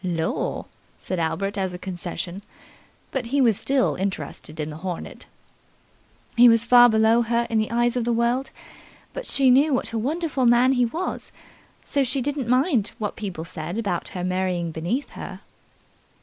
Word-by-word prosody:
"Lor'", 165 -3 -2 0.3
said 185 - -4
Albert 195 +5 -1
as 190 -2 -2
a - - -5
concession, 180 0 -5 0.7
but 255 -3 -3
he 280 +4 0
was 230 -6 +4
still 270 -1 +2
interested 160 -4 -5
in 155 0 -3
the 150 - -8
hornet. 175 0 -6 1.1
"He 240 0 +8
was 230 0 +3
far 245 0 +7
below 220 +1 +4
her 235 0 0
in 225 - +2
the 215 - -1
eyes 240 +1 +1
of 245 - 0
the 240 - 0
world, 235 +3 +1 0.6
but - - -6
she 265 -2 +4
knew 275 +2 +4
what 250 - -3
a 225 - 0
wonderful 285 0 0
man 240 +2 +5
he 250 -2 +3
was, 335 +10 -4 0.5
so 280 - +1
she 265 +2 -1
didn't 275 -1 -2
mind 255 - +2
what 210 -4 -3
people 185 -6 -5
said 170 +3 -6
about 200 -7 -2
her 180 - -3
marrying 180 -2 -1
beneath 175 - -3
her." - - -8
230 Hz, 170 wpm, -24 LUFS, 185-255 Hz, 1.1 s, He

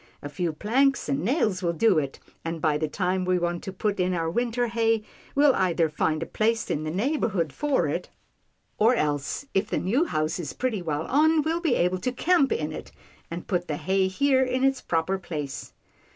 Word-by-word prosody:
A 145 - -5
few 170 +3 -2
planks 260 - +1
and 140 - +1
nails 215 - +1
will 170 -2 0
do 185 0 +3
it, 140 -2 -5 0.2
and, 165 0 -3
by 155 -1 +2
the 155 +1 0
time 185 +3 -1
we 185 0 +2
want 175 0 -1
to 190 - -5
put 200 +1 -2
in 180 0 +1
our 165 -1 -1
winter 240 +3 0
hay, 225 -1 +1 0.3
we'll 285 -1 +5
either 175 -5 +1
find 155 +1 0
a - - -5
place 225 +4 0
in 150 - -1
the - - -2
neighbourhood 190 - 0
for 295 -2 +1
it, - - -3 0.7
or 230 +4 +5
else 145 - -1
if 200 +2 +1
the - - 0
new 245 - +1
house 155 - -1
is 160 -5 -5
pretty 240 -6 -2
well 155 -2 -2
on, 310 +3 +3
we'll 325 +2 -1
be 315 -8 +2
able 180 +1 +1
to 255 - -1
camp 300 +2 +2
in 155 0 -1
it, - - -8 0.4
and 170 +1 -6
put 175 -2 -1
the 150 - -2
hay 190 0 +1
here 265 +7 +2
in 255 0 0
its 270 0 +2
proper 175 +3 0
place." 150 -6 -6
190 Hz, 210 wpm, -26 LUFS, 165-250 Hz, 0.7 s, we'll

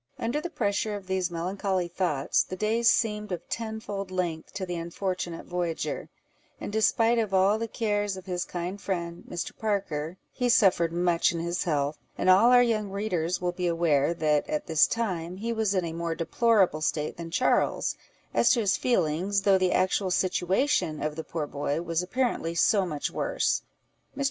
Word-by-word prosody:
Under 240 +6 -1
the 345 - -4
pressure 210 -6 -1
of 200 -2 -7
these 190 -1 -1
melancholy 185 +2 -2
thoughts, 170 -5 0
the 185 - -4
days 225 +4 +2
seemed 210 -4 +1
of 175 -1 -5
tenfold 220 -4 -4
length 175 -4 -3
to 190 - -3
the 180 -1 -4
unfortunate 170 0 -4
voyager; 175 -2 -3 0.5
and - - -5
in - - -7
despite 225 +2 +3
of 210 -4 0
all 195 +3 +4
the 230 - -2
cares 205 -3 -1
of 185 - -10
his 180 -2 -2
kind 180 +3 -5
friend, 170 -3 -3
Mr. 175 - -4
Parker, 185 -6 -2 0.2
he 250 -1 0
suffered 180 -7 +4
much 175 0 +2
in 170 - -3
his 170 +1 -2
health; 145 -2 0 0.2
and, 185 - +4
all 205 +6 +6
our 245 0 +7
young 215 -4 0
readers 185 -4 -1
will 180 -1 -1
be 180 0 -2
aware, 165 -2 +2
that, 150 -2 +1
at 150 - -2
this 160 -2 +4
time, 185 -6 -2
he 230 +4 -2
was 220 -3 0
in 185 -2 +1
a 165 - -4
more 165 0 -2
deplorable 190 -2 +2
state 150 0 -1
than 170 -1 -6
Charles, 220 +10 +1 0.4
as - - +4
to 245 - +2
his 200 -4 +2
feelings, 195 -3 +1
though 195 -1 +4
the 185 -1 +2
actual 185 +1 +1
situation 185 - +1
of 150 0 -2
the 160 - -5
poor 160 -2 -3
boy 145 +1 -2
was 165 0 -1
apparently 180 -4 -1
so 195 +2 +3
much 150 -4 -3
worse. - - 0 0.6
Mr. - - -6
185 Hz, 185 wpm, -27 LUFS, 170-210 Hz, 0.6 s, our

